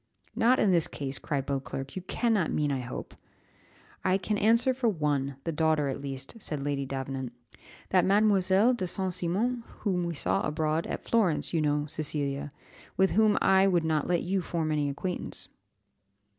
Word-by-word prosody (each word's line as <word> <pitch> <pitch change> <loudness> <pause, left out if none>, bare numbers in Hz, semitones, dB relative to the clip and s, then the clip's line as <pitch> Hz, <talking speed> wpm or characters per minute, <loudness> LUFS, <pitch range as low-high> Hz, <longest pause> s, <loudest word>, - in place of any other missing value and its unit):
"Not 245 +3 +4
in 200 - +3
this 170 -3 +3
case," 135 -1 -5
cried 140 -3 -2
Beauclerc; 135 -1 -4
"you 185 - -3
cannot 210 -1 0
mean 150 -1 0
I 135 - -1
hope." 125 0 -6 0.9
"I 185 0 +3
can 205 +2 -2
answer 230 +5 +3
for 250 -2 +1
one, 145 -6 -1
the 165 - -2
daughter 155 -2 +1
at 135 - -4
least," 135 -1 -6
said 150 -6 -4
Lady 140 -1 -2
Davenant; 135 -2 -4 0.6
"that 185 -2 +4
Mad. 200 +2 +4
de 195 +2 +3
St. 185 +1 -2
Cimon, 205 +8 -1 0.2
whom 185 -4 +1
we 170 -1 -3
saw - - 0
abroad, 155 +1 -1
at - - -4
Florence, 195 -11 +1
you 165 - +2
know, 150 -1 +1
Cecilia, 145 -2 -2 0.5
with 190 0 +4
whom 215 -1 +4
I 190 0 +5
would 175 -3 +2
not 155 -2 0
let 175 -1 +1
you 190 +2 0
form 165 -2 -2
an 150 -2 +1
acquaintance." 180 +6 -5
165 Hz, 170 wpm, -28 LUFS, 145-190 Hz, 0.9 s, I